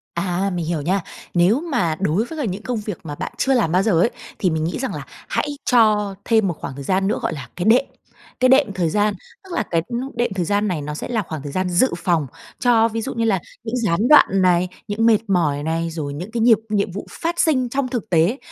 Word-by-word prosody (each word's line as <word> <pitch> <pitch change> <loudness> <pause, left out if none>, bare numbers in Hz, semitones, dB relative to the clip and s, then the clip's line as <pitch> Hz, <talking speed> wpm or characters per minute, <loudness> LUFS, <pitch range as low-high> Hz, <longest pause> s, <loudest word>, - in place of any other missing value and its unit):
À, 180 +3 -1
mình 170 -2 -2
hiểu 165 -2 -2
nha. 185 +6 0 0.3
Nếu 185 +9 +4
mà 175 - +1
đối 195 +4 +1
với 320 +5 -8
cả 285 - -1
những 200 0 -4
công 250 -2 -2
việc 210 -3 -5
mà 150 -3 -6
bạn - - -5
chưa 270 - +2
làm 225 -11 +2
bao 180 +2 +3
giờ 220 - +2
ấy, 230 - +3 0.3
thì 185 - +2
mình 160 -1 -1
nghĩ 165 - -2
rằng 265 - -3
là - - -5 0.3
hãy 290 -1 -2
cho 215 -5 +3
thêm 220 -4 +3
một 175 - -1
khoảng 130 - -6
thời 140 - -7
gian 190 +5 +1
nữa 210 - 0
gọi - - -1
là 140 -5 -7
cái 175 - -3
đệm, 240 +5 +5 0.5
cái 255 0 +4
đệm 265 -6 +4
thời 175 -3 +1
gian. 210 +4 +1 0.3
Tức 380 -2 -10
là 240 - 0
cái, 165 -1 +2
ưm, 240 -1 -3 0.2
đệm 240 -4 0
thời 180 - -1
gian 205 +4 +1
này 175 -6 -2
nó 150 +1 -5
sẽ 150 - -5
là 230 -3 0
khoảng 160 -5 -6
thời 145 - -6
gian 185 +3 -1
dự 180 +9 +2
phòng 170 -5 0 0.3
cho 230 -2 +4
ví 225 0 -3
dụ 265 - -4
như 230 -1 -1
là 200 -4 +2 0.2
những 225 +1 -3
gián 215 -1 +1
đoạn 300 - +8
này, 180 -1 +3 0.2
những 210 +2 0
mệt 225 -2 +5
mỏi 155 -6 +1
này, 165 +1 -1
rồi 155 -3 -4
những 175 +9 -7
cái 235 0 -2
nhịp 225 -1 +6
nhiệm 200 -3 0
vụ 200 +4 -7
phát 340 +1 -3
sinh 255 -6 +2
trong 270 +1 -1
thực 240 -3 -4
tế. 175 +9 +3
200 Hz, 260 wpm, -21 LUFS, 170-235 Hz, 0.5 s, đoạn